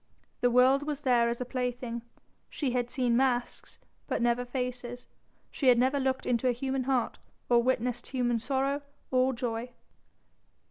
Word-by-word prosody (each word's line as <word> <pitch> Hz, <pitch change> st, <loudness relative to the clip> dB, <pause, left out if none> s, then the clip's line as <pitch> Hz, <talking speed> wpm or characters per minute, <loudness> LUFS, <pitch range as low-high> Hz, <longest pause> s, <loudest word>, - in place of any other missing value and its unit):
The 245 Hz, -, +3 dB
world 255 Hz, +3 st, +5 dB
was 295 Hz, -1 st, -4 dB
there 240 Hz, -4 st, +3 dB
as 235 Hz, -, -3 dB
a -, -, -1 dB
plaything; 245 Hz, -1 st, -3 dB, 0.5 s
she 275 Hz, -5 st, -2 dB
had 245 Hz, -1 st, -1 dB
seen 245 Hz, -2 st, +1 dB
masks 245 Hz, -1 st, 0 dB, 0.3 s
but -, -, -1 dB
never 240 Hz, +1 st, +2 dB
faces, 245 Hz, -1 st, -4 dB, 0.5 s
she 275 Hz, -, -1 dB
had 250 Hz, -1 st, +7 dB
never 260 Hz, +3 st, +2 dB
looked 265 Hz, -1 st, -1 dB
into 245 Hz, +1 st, +1 dB
a 250 Hz, -, +3 dB
human 265 Hz, +1 st, -2 dB
heart 255 Hz, -3 st, 0 dB, 0.3 s
or 240 Hz, -1 st, +5 dB
witnessed 245 Hz, -1 st, -1 dB
human 240 Hz, -3 st, 0 dB
sorrow 275 Hz, +3 st, -1 dB, 0.3 s
or 255 Hz, 0 st, +3 dB
joy. 235 Hz, -1 st, -3 dB
250 Hz, 155 wpm, -29 LUFS, 240-265 Hz, 0.5 s, had